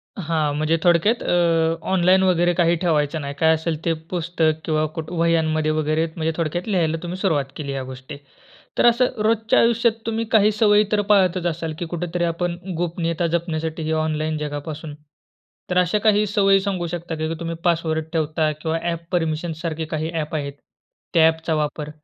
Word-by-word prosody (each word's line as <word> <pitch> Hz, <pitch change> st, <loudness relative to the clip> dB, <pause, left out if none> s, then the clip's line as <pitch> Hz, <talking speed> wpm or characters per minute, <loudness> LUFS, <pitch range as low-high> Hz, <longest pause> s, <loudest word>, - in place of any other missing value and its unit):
हां. 155 Hz, -5 st, -1 dB
म्हणजे 155 Hz, +2 st, +1 dB
थोडक्यात 175 Hz, +7 st, +3 dB
अ, 165 Hz, -2 st, +2 dB, 0.2 s
ऑनलाईन 185 Hz, +1 st, +4 dB
वगैरे 175 Hz, -1 st, +3 dB
काही 170 Hz, 0 st, +3 dB
ठेवायचं 155 Hz, -2 st, +1 dB
नाही. 140 Hz, 0 st, -5 dB
काय 160 Hz, 0 st, +5 dB
असेल 160 Hz, 0 st, -2 dB
ते 165 Hz, -, +2 dB, 0.2 s
पुस्तक 165 Hz, -2 st, 0 dB
किंवा 155 Hz, -1 st, +1 dB
कुठ 160 Hz, -1 st, -5 dB
वह्यांमध्ये 160 Hz, -2 st, +1 dB
वगैरे 155 Hz, +1 st, 0 dB
म्हणजे 160 Hz, -1 st, -1 dB
थोडक्यात 170 Hz, +4 st, -2 dB
लिहायला 165 Hz, -5 st, +1 dB
तुम्ही 175 Hz, +1 st, -4 dB
सुरुवात 155 Hz, -9 st, +1 dB
केली 140 Hz, -3 st, -4 dB
ह्या 135 Hz, -1 st, -3 dB
गोष्टी. 130 Hz, +2 st, -9 dB, 0.6 s
तर -, -, +3 dB
असं 240 Hz, -2 st, +3 dB
रोजच्या 225 Hz, 0 st, +2 dB
आयुष्यात 230 Hz, 0 st, +3 dB
तुम्ही 225 Hz, 0 st, -1 dB
काही 215 Hz, -1 st, +5 dB
सवयी 210 Hz, 0 st, +4 dB
तर 210 Hz, -1 st, +3 dB
पाहतच 185 Hz, -3 st, +3 dB
असाल 165 Hz, -1 st, -3 dB
की 175 Hz, -, -2 dB
कुठेतरी 175 Hz, 0 st, -2 dB
आपण 170 Hz, +1 st, -1 dB, 0.2 s
गोपनीयता 170 Hz, 0 st, -1 dB
जपण्यासाठी 160 Hz, -1 st, -2 dB
ही 160 Hz, -, -2 dB
ऑनलाईन 155 Hz, 0 st, -1 dB
जगापासून. 150 Hz, +1 st, -5 dB, 0.8 s
तर 180 Hz, -, 0 dB
अशा 180 Hz, +3 st, +3 dB
काही 210 Hz, 0 st, +3 dB
सवयी 195 Hz, -1 st, +4 dB
सांगू 190 Hz, -3 st, -2 dB
शकता 170 Hz, -1 st, -5 dB
का? 155 Hz, 0 st, -2 dB
की 165 Hz, -, -2 dB
तुम्ही 165 Hz, 0 st, -4 dB
पासवर्ड 160 Hz, -2 st, 0 dB
ठेवता 155 Hz, 0 st, 0 dB
किंवा 160 Hz, 0 st, -1 dB
ॲप 170 Hz, -1 st, -3 dB
परमिशनसारखे 160 Hz, -1 st, -2 dB
काही 155 Hz, +1 st, -3 dB
ॲप 155 Hz, -1 st, -3 dB
आहेत, 140 Hz, -2 st, -3 dB, 0.6 s
त्या 160 Hz, -1 st, +6 dB
ॲपचा 160 Hz, 0 st, -1 dB
वापर? 150 Hz, 0 st, -2 dB
165 Hz, 170 wpm, -22 LUFS, 155-180 Hz, 0.8 s, त्या